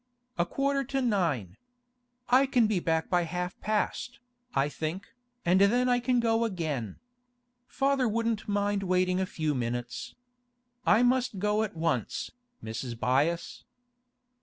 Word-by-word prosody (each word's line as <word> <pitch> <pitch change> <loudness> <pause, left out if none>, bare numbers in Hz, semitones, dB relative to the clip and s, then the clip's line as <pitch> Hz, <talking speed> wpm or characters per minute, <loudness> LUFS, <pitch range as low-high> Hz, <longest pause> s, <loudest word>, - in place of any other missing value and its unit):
A 170 - +2
quarter 275 +3 0
to 270 +2 -1
nine. 165 - 0 0.7
I 260 +3 +5
can 250 -4 +3
be 210 -3 +1
back 160 -1 0
by 180 -1 +2
half 180 +2 -4
past, 215 +3 -1 0.4
I 135 +1 +3
think, 160 +5 -5 0.3
and 180 +3 +4
then 245 +5 +4
I 245 -1 +3
can 245 0 +1
go 230 0 +2
again. 155 - -2 0.7
Father 270 -2 +1
wouldn't 230 0 -1
mind 205 0 0
waiting 185 -1 +1
a 190 - -1
few 155 -4 -1
minutes. 120 -1 -4 0.7
I 220 +4 +5
must 250 -3 +2
go 210 +2 +1
at 215 -5 -3
once, 160 -9 -1 0.3
Mrs. 115 +2 -5
Byass. 145 +8 0
195 Hz, 135 wpm, -29 LUFS, 160-235 Hz, 0.7 s, I